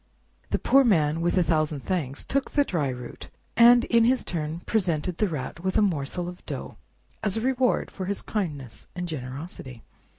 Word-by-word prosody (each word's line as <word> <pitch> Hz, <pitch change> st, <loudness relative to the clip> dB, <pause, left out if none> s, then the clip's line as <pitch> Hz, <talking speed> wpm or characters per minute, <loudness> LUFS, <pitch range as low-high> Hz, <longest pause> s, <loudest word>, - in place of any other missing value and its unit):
The -, -, +1 dB
Poor 275 Hz, +1 st, +5 dB
Man, 165 Hz, -, +2 dB
with 175 Hz, +2 st, +1 dB
a 180 Hz, -, +5 dB
thousand 155 Hz, -3 st, 0 dB
thanks, 145 Hz, -5 st, -2 dB
took 275 Hz, 0 st, -1 dB
the 290 Hz, -, +3 dB
dry 165 Hz, -, -1 dB
root, 125 Hz, -1 st, -8 dB, 0.3 s
and 240 Hz, +1 st, +7 dB
in 230 Hz, -1 st, +4 dB
his 255 Hz, +1 st, +3 dB
turn 160 Hz, 0 st, -4 dB
presented 180 Hz, -5 st, 0 dB
the 210 Hz, -, +3 dB
Rat 155 Hz, -2 st, -5 dB
with 190 Hz, +4 st, -1 dB
a -, -, +5 dB
morsel 175 Hz, -1 st, -1 dB
of 180 Hz, 0 st, -9 dB
dough, -, -, -6 dB, 0.4 s
as 210 Hz, -1 st, 0 dB
a -, -, -1 dB
reward 255 Hz, 0 st, +1 dB
for 190 Hz, -, -5 dB
his 200 Hz, +1 st, -3 dB
kindness 140 Hz, -, -4 dB
and 180 Hz, 0 st, -3 dB
generosity. 130 Hz, -3 st, -7 dB
175 Hz, 185 wpm, -26 LUFS, 150-215 Hz, 0.4 s, and